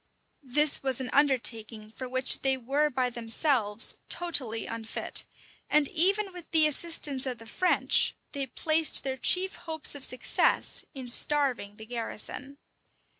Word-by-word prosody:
[] - - -45 0.2
This 300 -1 +5
was 265 -2 0
an 255 -1 -6
undertaking 230 -6 0
for 255 +2 -9
which 260 +1 +3
they 265 -1 +1
were 275 +5 -1
by 255 -2 -2
themselves 230 -1 0
totally 260 -11 0
unfit; 225 -1 -1 0.4
and 300 -1 +3
even 390 +4 +1
with 355 -2 -12
the 315 -2 +5
assistance 295 -3 -1
of 250 -2 -4
the 225 - -14
French, 365 +10 +2 0.2
they 275 -2 -4
placed 315 +4 +2
their 265 -1 -4
chief 370 +8 +3 0.2
hopes 315 -1 0
of 285 -2 -8
success 255 - 0
in 260 -2 -8
starving 250 -5 +1
the 220 - -12
garrison. 245 +4 -6
265 Hz, 145 wpm, -27 LUFS, 235-300 Hz, 0.4 s, This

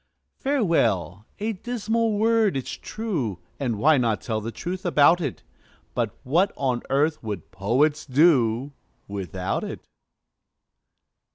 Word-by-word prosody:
"Farewell!" 115 - +1
A 220 +2 -2
dismal 225 +1 -1
word, 220 -3 +3
'tis 135 - -3
true 165 - -3 0.2
(And 120 -6 -1
why 145 +6 +4
not 115 -3 +1
tell 110 -2 -2
the 115 +2 -4
truth 180 +8 -5
about 170 0 +5
it!); 140 -7 -4 0.5
But - - -2
what 175 +10 +2
on 130 -3 0
earth 150 +3 +1
would 105 -7 -6
poets 130 +11 +1
do 135 -3 +3 0.3
Without 95 -2 -3
it? - - -7
140 Hz, 120 wpm, -25 LUFS, 110-190 Hz, 0.5 s, about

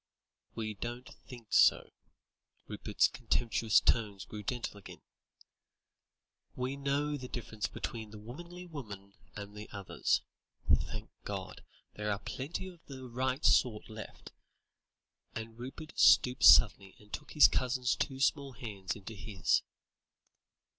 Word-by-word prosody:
"We 110 -1 -3
don't 120 +4 -6
think 120 -4 -11
so," - - +5 0.8
Rupert's - - +1
contemptuous 115 -2 +2
tones 105 -4 +1
grew 105 - -7
gentle 120 0 -4
again; 100 - -12 1.5
"we 130 +2 -2
know 140 +1 -1
the 130 -2 -7
difference 110 -4 -4
between 110 -2 -6
the 105 - -10
womanly 170 +12 -9
woman 105 - -9 0.2
and 105 0 -8
the 105 +1 -8
others. 100 -2 -1 0.4
Thank - - 0
God, - - -6 0.3
there 105 0 -2
are 100 - 0
plenty 140 - -5
of 175 -3 -13
the 130 -2 -8
right 130 +3 -1
sort 110 -5 +3
left," 110 -1 -9 1.0
and 115 +1 -7
Rupert 135 +5 -8
stooped 125 +1 +6
suddenly 100 -3 +7
and 105 0 -20
took 150 - -6
his 150 - +9
cousin's 125 -1 0
two 135 -2 -2
small 140 0 +1
hands 100 -7 -5
into 105 +2 -9
his. 100 -1 +1
120 Hz, 125 wpm, -32 LUFS, 105-135 Hz, 1.5 s, his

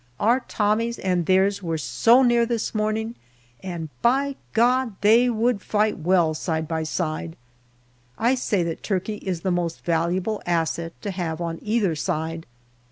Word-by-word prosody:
Our 235 +5 +3
Tommies 230 0 0
and 180 -3 -1
theirs 195 +2 +3
were 165 -3 -2
so 190 - +4
near 240 -1 +4
this 230 -1 -2
morning, 215 +1 -1 0.5
and, 170 -4 -5
by 275 +3 +2 0.2
God! 245 -1 +2
they 230 +5 +5
would 230 -2 +1
fight 210 -1 0
well 170 -1 +2
side 160 0 -2
by 160 0 -2
side. 160 0 -3 0.8
I 240 +3 +2
say 210 -8 0
that 165 -1 -4
Turkey 205 +1 -2
is 185 -4 -4
the 190 - 0
most 175 -2 -2
valuable 175 +5 0
asset 165 -1 -2
to 205 - -2
have 170 -4 -3
on 165 -1 -3
either 210 -5 +1
side. 165 0 -3
190 Hz, 155 wpm, -24 LUFS, 165-225 Hz, 0.8 s, they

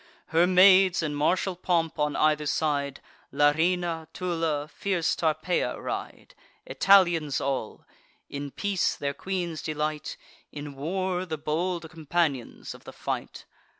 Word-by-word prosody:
Her 170 +1 +4
maids, 185 0 +6
in 150 -2 -2
martial 180 +5 +1
pomp, 170 -3 0
on 150 0 0
either 150 -1 +2
side, 145 -2 -1 0.3
Larina, 165 +2 +1
Tulla, 165 -5 -1
fierce 175 0 -1
Tarpeia, 165 +2 0
ride: - - -6 0.3
Italians 175 -7 +4
all; 135 -5 -3 0.4
in 140 0 -5
peace, 200 +5 0
their 140 -1 -3
queen's 175 0 -3
delight; 150 0 -3 0.3
In 145 -1 -7
war, 180 +6 -2
the 160 -2 -3
bold 165 +3 -2
companions 160 -5 -2
of - - -15
the - - -10
fight. - - -5
160 Hz, 120 wpm, -27 LUFS, 150-180 Hz, 0.4 s, maids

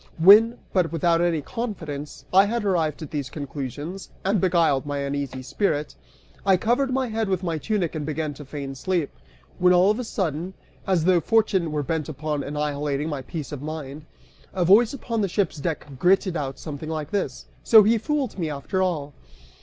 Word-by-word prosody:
When, 210 +8 +7 0.2
but 180 -3 +2
without 165 +1 +2
any 170 -3 +1
confidence, 160 - -5
I 195 +2 +7
had 225 +1 -2
arrived 165 -6 0
at 150 - -9
these 145 -4 -3
conclusions, 145 +5 -6 0.2
and 195 -1 +2
beguiled 165 -7 +3
my 145 -1 -3
uneasy 140 -2 -3
spirit, 150 +1 -1 0.5
I 190 -1 +4
covered 245 +7 +1
my 260 0 0
head 220 -1 -1
with 190 -1 -1
my 165 -3 -1
tunic 195 -3 -1
and 155 -2 -3
began 155 0 -3
to 145 - -10
feign 140 -1 -6
sleep, 170 +3 -1 0.5
when 180 0 +5
all 180 +3 +5
of 215 - -2
a - - -2
sudden, 180 - -3 0.3
as 180 -4 +2
though 185 -1 +5
Fortune 195 -4 +2
were 150 -1 -1
bent 160 0 -2
upon 150 0 -3
annihilating 150 0 -2
my 145 -3 -3
peace 150 +2 -6
of 145 -3 -6
mind, 150 -1 -7 0.5
a 180 -2 +1
voice 215 +6 +6
upon 230 -5 -3
the 200 - 0
ship's 185 -3 0
deck 160 +2 -3
gritted 185 +1 +3
out 135 -4 -3
something 155 0 -7
like 155 -2 -4
this 190 -11 -2 0.2
"So 220 -2 +8
he 225 +2 +3
fooled 275 -4 -2
me 165 -3 -1
after 150 +6 -2
all." 155 -6 -1
165 Hz, 185 wpm, -24 LUFS, 145-195 Hz, 0.5 s, So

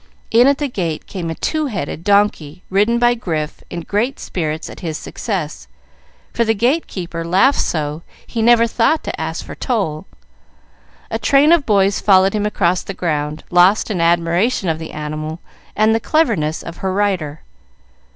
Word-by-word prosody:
In 240 +3 +6
at 280 0 +3
the 290 - -1
gate 175 - -3
came 175 -4 -5
a 165 - -3
two 310 - -1
headed 170 - -4
donkey, 195 -5 +1
ridden 210 +5 +3
by 240 0 +4
Grif, 160 -10 -4
in 175 - -5
great 220 +10 -1
spirits 155 -2 -3
at - - -10
his 160 -3 -4
success, 160 - -5 0.7
for 235 - +2
the 225 -1 +1
gate 255 +10 +1
keeper 170 -3 -5
laughed 190 +12 +3
so 150 -1 -2 0.2
he 230 - -3
never 230 0 +5
thought 235 +7 +1
to - - -5
ask - - -4
for - - -8
toll. 195 - -2 1.0
A - - -1
train 280 +3 +4
of 335 -4 +3
boys 200 -2 +2
followed 190 -1 +4
him 210 -1 0
across 180 -3 +1
the 195 - -7
ground, 150 -3 -2
lost 180 +5 +4
in 180 -5 -1
admiration 170 +5 +1
of 160 -1 -1
the 160 - -7
animal 155 +2 -5 0.4
and 215 +1 +3
the 225 - +2
cleverness 215 - 0
of 170 - -8
her 190 - -2
rider. 185 -7 -1
190 Hz, 170 wpm, -18 LUFS, 160-230 Hz, 1.0 s, In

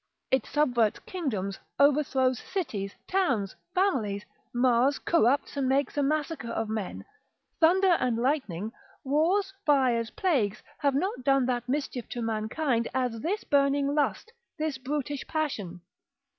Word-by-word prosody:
It 265 - +2
subverts 245 -8 +2
kingdoms, 210 - -3 0.2
overthrows 265 -3 +3
cities, 210 - -4
towns, 260 - 0 0.2
families, 230 - +1 0.3
mars, 250 +2 +3
corrupts, 280 -4 +2
and 270 -2 0
makes 275 0 +1
a 290 - +1
massacre 300 -2 -1
of 225 -1 -2
men; 215 -3 -4 0.5
thunder 360 +2 +5
and 245 -2 +1
lightning, 230 - -1 0.3
wars, 345 +8 +1
fires, 255 - +3
plagues, 250 - 0 0.2
have 280 -2 +2
not 365 - -1
done 270 -1 +3
that 245 -1 -2
mischief 270 -3 -2
to 240 - -4
mankind, 230 +3 0
as 250 -3 0
this 380 - -2
burning 280 0 +2
lust, 300 +10 -1 0.2
this 305 -3 -2
brutish 285 +1 -3
passion. 210 - -3
270 Hz, 130 wpm, -28 LUFS, 230-300 Hz, 0.5 s, thunder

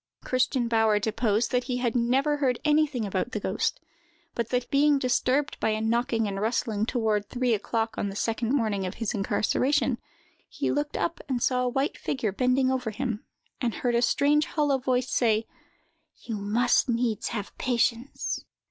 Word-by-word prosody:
Christian 255 -1 +1
Bauer 225 -2 +3
deposed 220 +1 0
that 250 -1 +1
he 250 -1 -2
had 245 -2 -1
never 265 +5 +2
heard 260 -4 +1
anything 295 -6 +2
about 200 +5 -2
the 210 - -1
ghost, 195 +1 -1 0.5
but 235 -1 -2
that, 250 -1 -1
being 290 +1 +4
disturbed 260 +2 +1
by - - +1
a 215 0 0
knocking 225 0 +1
and 195 0 -3
rustling 220 -1 0
toward 215 -5 0
three 250 -1 +1
o'clock 225 +1 -1
on 200 - -1
the 195 - -7
second 225 +2 -1
morning 220 -8 +1
of 185 - -6
his 225 0 -2
incarceration, 250 +7 +1 0.5
he - - -2
looked 290 0 -1
up 340 - -1
and 245 -3 0
saw 250 -1 +2
a 250 - +1
white 270 +4 -1
figure 235 -6 -1
bending 255 +4 +2
over 255 -3 -1
him, 230 -1 -3 0.4
and 240 -3 0
heard 245 -1 0
a 235 - +3
strange 295 +4 +3
hollow 290 -4 +1
voice 255 -1 0
say: 225 -2 +2 0.8
"You 225 -3 -4
must 225 +6 +2
needs 235 -3 0
have 210 -3 -5
patience!" 240 +1 -1
240 Hz, 175 wpm, -27 LUFS, 220-260 Hz, 0.8 s, being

